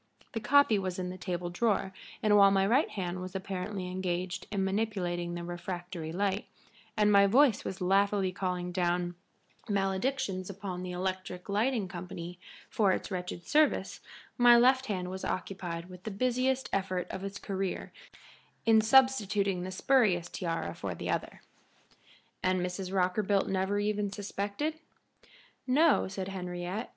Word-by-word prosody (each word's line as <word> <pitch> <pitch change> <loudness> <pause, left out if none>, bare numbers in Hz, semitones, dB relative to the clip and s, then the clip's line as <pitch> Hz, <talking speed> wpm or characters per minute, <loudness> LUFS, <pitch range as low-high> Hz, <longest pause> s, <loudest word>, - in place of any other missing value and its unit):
The 225 - -1
copy 255 -2 +4
was 185 -2 -3
in 180 -1 -3
the 185 - -7
table 175 -1 -3
drawer, 195 -1 0 0.3
and 210 -1 +5
while 200 -1 +8
my 195 0 +3
right 255 +9 +3
hand 180 -2 -4
was 185 +1 -7
apparently 190 0 -4
engaged 180 0 -3
in 200 -2 -1
manipulating 190 -4 -1
the 175 - -5
refractory 175 -1 -5
light, 195 +3 -1 0.5
and 210 -1 +4
my 200 -1 +6
voice 245 +1 +4
was 190 - -5
laughingly 195 +1 +2
calling 180 -1 -3
down 175 -1 0 0.6
maledictions 195 0 -1
upon 190 -2 -5
the 180 - -5
electric 185 0 -4
lighting 215 +1 +1
company 175 0 -7 0.3
for 205 -3 +2
its - - -4
wretched 180 -2 -4
service, 305 0 +2 0.4
my 240 0 +8
left 260 +2 +4
hand 185 -4 -2
was 190 0 -6
occupied 175 -3 -4
with 180 -1 -11
the - - -4
busiest 255 +5 0
effort 185 -2 -1
of 190 - -5
its 195 0 -5
career 195 -2 -4 0.7
in 225 -1 +6
substituting 215 -6 +3
the 185 - -4
spurious 185 -5 +2
tiara 165 -3 -3
for - - -5
the - - -3
other." - - -3 1.0
"And 185 0 +2
Mrs. 180 +1 -3
Rockerbilt 195 +1 +1
never 190 +1 0
even 205 -1 0
suspected?" 205 +10 -3 0.9
"No," 300 +5 +4
said 190 0 -5
Henriette. 180 +2 -4
190 Hz, 145 wpm, -30 LUFS, 180-210 Hz, 1.0 s, while